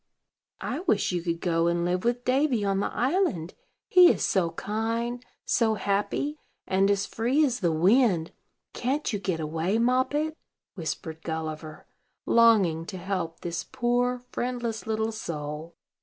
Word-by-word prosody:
"I 265 - -3
wish 335 - +1
you 175 -1 -1
could 170 -1 -3
go 170 -2 +1
and 170 0 +1
live 180 +1 0
with 240 +1 0
Davy 255 -4 +2
on 195 -1 +1
the - - -1
island; 250 - 0 0.3
he 360 -2 +8
is - - -1
so 185 -4 +2
kind, 230 +7 -3 0.2
so 220 -2 +2
happy, 210 +10 -1 0.3
and 195 +1 +2
as 200 -1 +2
free 255 +7 +1
as 250 -3 -1
the 175 -4 +1
wind. 180 0 +3 0.4
Can't 270 +1 -1
you 205 - -1
get 185 -4 -2
away, 160 +6 -1
Moppet?" 260 +6 +1 0.4
whispered 160 -2 -5
Gulliver, 155 -1 -5 0.4
longing 205 -9 +4
to 190 - -6
help 180 -3 -3
this 170 -1 -3
poor, 245 -1 0
friendless 240 -3 -3
little 220 0 0
soul. 155 -5 -6
205 Hz, 145 wpm, -27 LUFS, 170-245 Hz, 0.4 s, he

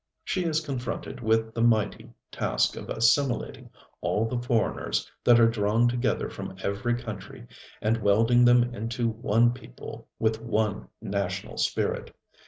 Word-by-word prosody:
She 185 -2 -1
is 160 -1 0
confronted 130 -1 -4
with 110 0 +1
the 115 - -2
mighty 110 -3 +1 0.2
task - - 0
of - - -8
assimilating 125 +3 +1 0.3
all 110 - +1
the 120 +1 -2
foreigners 120 -2 0 0.2
that 120 -1 +6
are 115 - +7
drawn 115 +1 +2
together 120 0 0
from - - -7
every 115 +5 0
country, 110 - -8 0.4
and 110 +2 +2
welding 115 +4 +4
them 120 0 +6
into 115 +1 -2
one 115 +1 +2
people 90 - -10
with 110 0 0
one 110 -3 -1 0.2
national 100 -3 -3
spirit. - - -1
115 Hz, 140 wpm, -27 LUFS, 110-120 Hz, 0.4 s, are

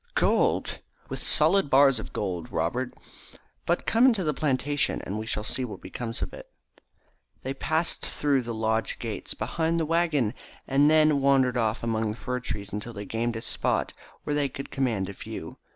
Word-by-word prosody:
"Gold!" - - +2 0.3
"With - - -4
solid 195 -7 +4
bars 135 -2 +5
of - - -7
gold, 90 -5 -3
Robert. 125 +11 -1 0.8
But 175 - +1
come 235 +3 +5
into 225 -7 +3
the 150 -2 +1
plantation 145 0 0
and 100 +3 -4
we 110 - -5
shall 105 - -2
see 130 - -1
what 120 - -6
becomes 115 +5 -5
of - - -4
it." - - -10 0.9
They 130 - -2
passed 160 +4 0
through 140 -3 +1
the 120 -1 -5
lodge 110 0 0
gates, 110 -4 -5
behind 160 +9 0
the 160 - +1
waggon, 155 -8 +1 0.3
and 140 +2 +4
then 155 -2 +4
wandered 135 -2 +4
off 115 -2 0
among 110 -1 0
the 105 - -4
fir 125 0 -3
trees 100 -5 -5
until 105 +3 -4
they 100 -1 -6
gained 115 +2 -2
a 115 - -4
spot - - 0 0.3
where 150 - -2
they 145 -1 +1
could 135 +1 -8
command 115 -9 0
a 100 - -6
view. - - -8
130 Hz, 185 wpm, -27 LUFS, 110-150 Hz, 0.9 s, bars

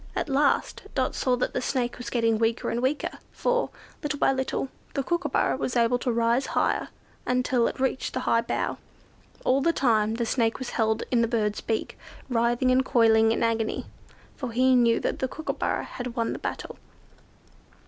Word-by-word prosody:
At - - -2
last 280 +1 +1
Dot 260 -2 +1
saw 255 -1 +1
that 250 - -2
the - - -1
Snake 250 -2 -1
was 245 - -5
getting 230 -2 +1
weak, 225 +1 +1 0.7
for, - - 0 0.3
little 295 -1 -2
by - - +3
little, 265 0 -2 0.3
the 275 - 0
Kookooburra 345 +5 0
was 250 - -2
able 240 +1 +3
to 245 - -1
rise 235 +2 +1
higher - - +2
with - - -8
it, - - -16
until 250 -1 +2
it - - -5
reached 265 0 -1
the 255 - -1
high 230 - +2
bough. 235 - -2 0.7
All 265 +2 +3
the 335 - +3
time 220 -7 +2
the 235 0 -1
Snake 230 -1 +1
was 260 - -5
held 220 0 +1
in 240 -2 +3
the 230 - +2
bird's 215 -3 -1
beak, 225 - -3 0.3
writhing 240 +1 +2
and 255 +1 +4
coiling 225 -3 +4
in 230 - 0
agony; 225 -1 0 0.5
for 255 -5 -5
he 255 +2 +4
knew 235 -2 +4
that - - -2
the 260 - 0
Kookooburra 315 +4 -2
had 245 -1 -6
won 230 -2 0
the - - -6
battle. - - -5
245 Hz, 185 wpm, -26 LUFS, 230-260 Hz, 0.7 s, and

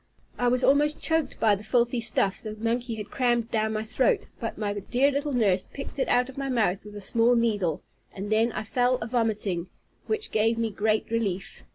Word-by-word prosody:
I 245 - +2
was 250 +1 +2
almost 295 +2 +3
choked 320 -4 0
with 210 -3 +4
the - - -11
filthy 240 +1 +1
stuff 210 -4 +1
the 215 -1 -6
monkey 230 +2 -2
had 210 -2 -7
crammed 240 -3 +1
down 220 0 0
my 215 0 -2
throat; 235 +3 +1
but 230 - -4
my 205 -2 -2
dear 245 +8 +1
little 285 +1 -2
nurse 205 -7 +2
picked 275 0 -7
it - - +1
out 250 0 +3
of 265 +1 -9
my 275 0 -2
mouth 215 -7 +1
with 210 0 -11
a 205 - -7
small 235 +4 +4
needle, 205 -9 0 0.3
and 200 +2 -6
then 225 +2 +3
I - - -3
fell 245 +3 +1
a 245 - -4
vomiting, 215 -7 -1 0.4
which 435 0 -2
gave 225 +1 +2
me 230 -1 -1
great 215 +2 0
relief. 205 -3 -3
230 Hz, 210 wpm, -26 LUFS, 210-250 Hz, 0.4 s, with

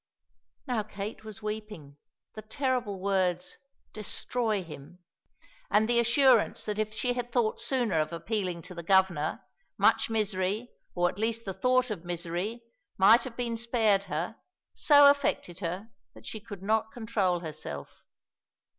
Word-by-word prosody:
Now 245 -4 0
Kate 210 0 -7
was 215 0 -9
weeping; 210 -10 -6 0.4
the 215 - -7
terrible 240 -3 -2
words 185 -2 0 0.3
"destroy 215 0 -1
him," 155 +1 -11 0.7
and 215 +1 +3
the 240 0 +3
assurance 240 0 +4
that 210 0 -3
if 215 0 -1
she 245 +3 -1
had 245 -1 -4
thought 235 -3 +1
sooner 240 - +1
of 155 +1 -1
appealing 180 0 -3
to 180 - -9
the 170 - -6
Governor, 175 -4 +2 0.3
much - - +3
misery, 210 +1 -1 0.2
or 175 0 +3
at 185 - -5
least 230 +1 -1
the 195 - -3
thought 250 +5 +2
of 185 -6 -5
misery, 175 +6 -3 0.3
might 220 +5 +7
have 240 -3 -8
been 235 -2 -2
spared 225 -4 +2
her, 170 +8 -3 0.4
so 290 -1 +7
affected 280 -11 +1
her 185 +5 -4 0.2
that 110 0 -14
she 220 - -5
could 200 -3 -10
not 220 +1 +1
control 205 -7 0
herself. 150 - -7
210 Hz, 145 wpm, -29 LUFS, 180-230 Hz, 0.7 s, might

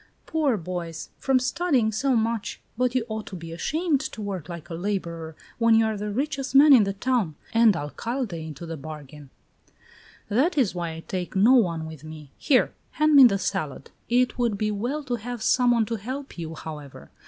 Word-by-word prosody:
"Poor 295 -7 +1
boys! 170 -2 -5
From 270 -1 +2
studying 255 -3 +1
so 260 +5 +1
much! 225 -1 -1 0.2
But 250 +1 0
you 245 -3 +1
ought 220 -1 -5
to 190 - -7
be 165 -2 -8
ashamed 305 - 0
to 305 -5 -6
work 195 -5 -5
like 170 -2 -7
a - - -3
laborer, 170 -3 -4 0.2
when 230 -1 +5
you 225 0 +4
are 220 -1 -1
the 210 +1 -4
richest 275 +4 -2
man 285 +1 +9
in 230 -6 +7
the 195 - -2
town, 210 -6 0 0.2
and 225 -3 +5
Alcalde 230 - -4
into 155 +2 -8
the 165 -1 -6
bargain." 150 -1 -10 1.0
"That 290 - +1
is 250 -9 +2
why 170 -2 -3
I 165 - -8
take 180 -1 -4
no 215 +7 +6
one 170 -10 +2
with 160 -2 -9
me. 155 -3 -10
Here, 260 -4 +3 0.2
hand 305 0 +3
me 275 -2 +10
that 195 -5 +4
salad!" 150 -3 -3 0.2
"It 250 +1 +2
would 235 -4 +1
be 215 +1 0
well 245 +9 -2
to 245 -3 -2
have 240 +1 -6
some 250 +1 +3
one 235 -2 +3
to 230 +2 -3
help 260 +7 -6
you, 165 -2 -6
however. 145 - -9
215 Hz, 200 wpm, -25 LUFS, 165-255 Hz, 1.0 s, me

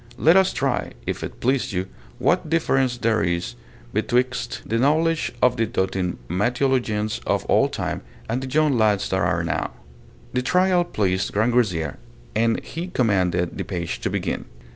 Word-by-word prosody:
Let 160 +7 +5
us 190 -1 +5
try, 135 -2 -1
if - - -3
it - - -7
please 130 -3 0
you, 90 0 -1 0.3
what - - +1
difference 135 -6 +2
there 115 -4 +1
is 85 +1 -1 0.4
betwixt 125 -1 0
the 115 - 0
knowledge 160 +4 +2
of 125 -1 +4
the 115 -1 +1
doting 95 -4 -1
Mateologians 115 - 0
of - - +1
old - - +3
time - - -3 0.3
and 120 +3 -1
the 130 - -5
young 150 0 +3
lads 105 -4 +2
that 95 - +1
are 80 -3 +1
now. 80 - -1 0.6
The 125 - +1
trial 180 +5 +3
pleased 95 - 0
Grangousier, 105 - +1 0.4
and 115 +1 +2
he 170 +3 -5
commanded 90 - +1
the - - 0
page 85 -3 -4
to - - -2
begin. - - -2
115 Hz, 160 wpm, -23 LUFS, 95-135 Hz, 0.6 s, Let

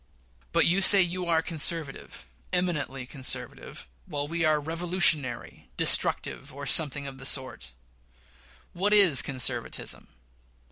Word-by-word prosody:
But - - +2
you 180 +4 +2
say 195 0 +7
you 180 0 -4
are 165 -1 +1
conservative 165 -3 -2 0.3
eminently 150 -7 -3
conservative 130 -2 -6 0.2
while 145 0 -4
we 165 +2 -3
are 155 -1 +2
revolutionary, 160 - -1
destructive, - - +2
or 140 +1 -9
something, 140 -1 +1
of 135 -1 -9
the 130 - -9
sort. 130 - -2 1.0
What 200 +4 0
is 190 -10 +6
conservatism? 130 -3 -5
150 Hz, 120 wpm, -26 LUFS, 135-175 Hz, 1.0 s, say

